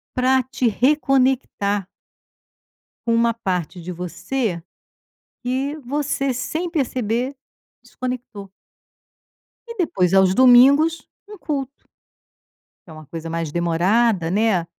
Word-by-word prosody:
para 260 +1 +3
te 255 -1 -2
reconectar 255 -6 +1 1.2
com 230 - +2
uma 230 0 +2
parte 180 -5 -3
de 180 - -7
você 180 +2 -3 0.8
que 265 +4 -2
você 275 0 -1
sem 315 +8 -3
perceber 255 - -1 0.5
desconectou 235 -6 -7 1.2
e 465 - -8
depois 190 - 0
aos 190 -1 +5
domingos 275 +6 +5 0.2
um 420 -2 -11
culto. 275 -6 -3 1.2
Que - - -13
é - - -10
uma 155 -1 -12
coisa 165 +1 -7
mais 165 -2 -3
demorada 175 +2 +1
né, 200 -4 +1
235 Hz, 105 wpm, -21 LUFS, 185-270 Hz, 1.2 s, aos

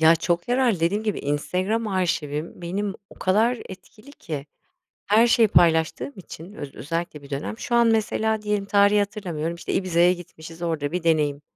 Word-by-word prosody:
ya, 160 +1 +7
çok 170 +3 -1
yararlı. 245 -7 +2
Dediğim 190 +6 +1
gibi 215 -2 -1
Instagram 185 +10 -1
arşivim 170 -4 -2
benim 195 +3 -2 0.2
o - - -13
kadar 220 +6 +2
etkili 215 +7 -13
ki 150 - -6 0.6
her 220 +3 +5
şeyi 230 -2 +4
paylaştığım 160 - +3
için 180 -1 -10
öz 145 -8 -8
özellikle 165 -1 -4
bir 140 - -14
dönem. 140 +10 -4
Şu 240 - -3
an 235 0 +5
mesela 220 -1 +1
diyelim 210 -1 -1
tarihi 200 +1 +4
hatırlamıyorum, 180 -6 -2
işte, 170 - -5
Ibiza'ya 180 -1 +3
gitmişiz, 165 -1 -10
orada 160 -3 -2
bir 180 0 -2
deneyim. 150 -3 +1
180 Hz, 165 wpm, -24 LUFS, 160-210 Hz, 0.6 s, ya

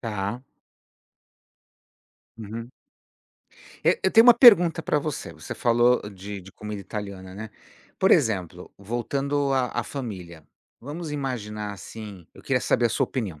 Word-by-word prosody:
Tá. 105 +1 -4 2.0
Uhum. 115 +2 -7 1.1
É. - - +4
Eu 190 - +2
tenho 225 +2 +7
uma 245 - +10
pergunta 180 -9 +7
para 150 - +1
você, 145 - -5
você 80 0 -8
falou 120 +1 +3
de 100 +1 -8
de 95 +1 -14
comida 105 -1 -7
italiana, 100 -2 -7
né, 105 +2 -7 0.5
por 190 - +3
exemplo, 95 - +1
voltando 135 +7 -1
à 130 -2 +1
à - - -4
família, 95 - -7 0.4
vamos 150 +5 -6
imaginar 105 -7 -4
assim 100 -2 -10
eu - - -15
queria 130 -2 0
saber 120 - +2
a - - 0
sua 135 - +1
opinião, 105 - -5
115 Hz, 140 wpm, -25 LUFS, 100-140 Hz, 2.0 s, uma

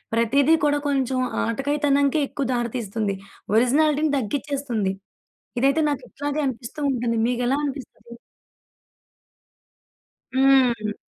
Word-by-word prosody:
ప్రతిది 265 +7 +3
కూడా 290 0 +2
కొంచెం 265 -2 0 0.3
ఆటకాయి 275 +6 -1
తనంకే 280 +1 +3
ఎక్కువ 275 -1 -3
దారి 240 -1 -1
తీస్తుంది. 215 -3 -2 0.4
ఒరిజినాలిటీని 295 +5 +3
తగ్గించేస్తుంది. 260 -4 -2 0.7
ఇదైతే 275 +5 +3
నాకు 285 - -3
ఇట్లాగే 290 +1 -3
అనిపిస్తూ 255 +3 -5
ఉంటుంది. 240 -3 -1
మీకెలా 245 +2 0
అనిపిస్తది? 260 -5 -7 2.2
హ్మ్. 255 -5 +3
265 Hz, 100 wpm, -23 LUFS, 235-285 Hz, 2.2 s, ప్రతిది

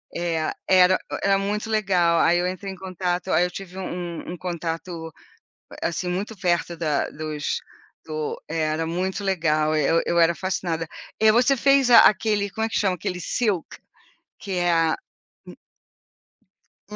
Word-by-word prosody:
Eh, 165 -2 -1 0.2
era 185 0 +6 0.3
era 195 0 +4
muito 205 +2 -2
legal. 185 -6 +2
Aí 175 +1 +4
eu 180 - 0
entrei 185 +2 -5
em - - -10
contato 185 -1 -3
aí 175 - +4
eu 180 - -4
tive 185 0 -9
um 175 -2 -5
um - - -5
contato, 165 -1 -5 0.7
assim, 175 +2 -2
muito 200 +5 -3
perto 175 -2 0
da 155 -4 0
dos 155 -1 -3 0.5
do 155 -1 -4
era 160 0 -1
muito 185 +4 -2
legal! 155 -5 +1
Eu 155 +2 +2
eu 170 - +2
era 170 0 +5
fascinada. 170 -3 -3 0.3
E 220 0 +7
você 245 +5 +4
fez 275 -1 +3
a 235 - +10
aquele, 210 0 +3
como 220 +4 -2
é - - -3
que - - 0
chama? 190 -3 +1
Aquele 180 0 -4
silk, 205 -1 -1 0.6
que 200 - -7
é 175 -1 +1
a 165 -1 +2 2.0
u - - -6
180 Hz, 155 wpm, -24 LUFS, 165-195 Hz, 2.0 s, a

